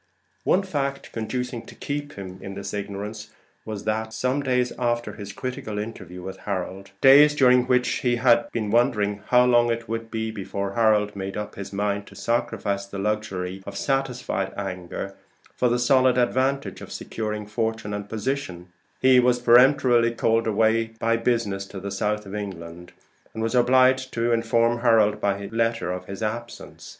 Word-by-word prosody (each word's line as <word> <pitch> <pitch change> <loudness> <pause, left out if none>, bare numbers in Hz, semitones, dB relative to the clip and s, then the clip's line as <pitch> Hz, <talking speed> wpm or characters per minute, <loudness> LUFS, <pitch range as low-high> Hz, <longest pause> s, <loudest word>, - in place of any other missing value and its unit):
One 195 - +3
fact 140 -7 -3
conducing 125 +1 -3
to - - -12
keep 145 0 -4
him 95 -1 -8
in 95 0 -7
this 100 0 -6
ignorance 105 +1 -5 0.4
was, 110 -2 -5
that 110 +1 -2
some 130 +4 0
days 125 -2 +1
after 120 -3 -1
his 100 -1 -8
critical 110 -1 -5
interview 95 -4 -6
with 95 +1 -7
Harold 95 0 -5
days 145 +3 +8
during 125 -3 +5
which 125 -1 +3
he 120 -1 +1
had 120 -1 +3
been 110 -3 -2
wondering 105 -4 +2
how 125 0 +5
long 120 -1 +4
it 115 0 -3
would 115 0 -4
be 110 -1 -3
before 100 -1 -4
Harold 105 -2 +2
made 95 0 -5
up 105 - -5
his 100 0 -7
mind 100 0 -2
to 100 - -14
sacrifice 100 -2 -1
the 100 - -7
luxury 95 -2 -2
of - - -6
satisfied 130 -7 -1
anger 95 0 -5 0.4
for 125 - +2
the 120 - +2
solid 130 0 +4
advantage 130 +3 0
of - - -10
securing 105 -1 -4
fortune 110 0 -2
and 105 0 -5
position 105 -6 -4 0.3
he 130 -1 +7
was 125 0 +3
peremptorily 120 -1 +5
called 115 0 +1
away 110 +1 +2
by 115 0 +2
business 115 -4 0
to 100 - -8
the 100 +1 -6
south 105 +1 -1
of 95 - -9
England, 90 -4 -7 0.4
and 110 - -3
was 115 - -1
obliged 130 +1 +4
to 120 0 0
inform 115 +1 +2
Harold 110 -3 +3
by 100 0 0
letter 115 -4 0
of 90 0 -5
his 100 +3 -6
absence. 120 +2 -6
110 Hz, 170 wpm, -24 LUFS, 100-125 Hz, 0.4 s, days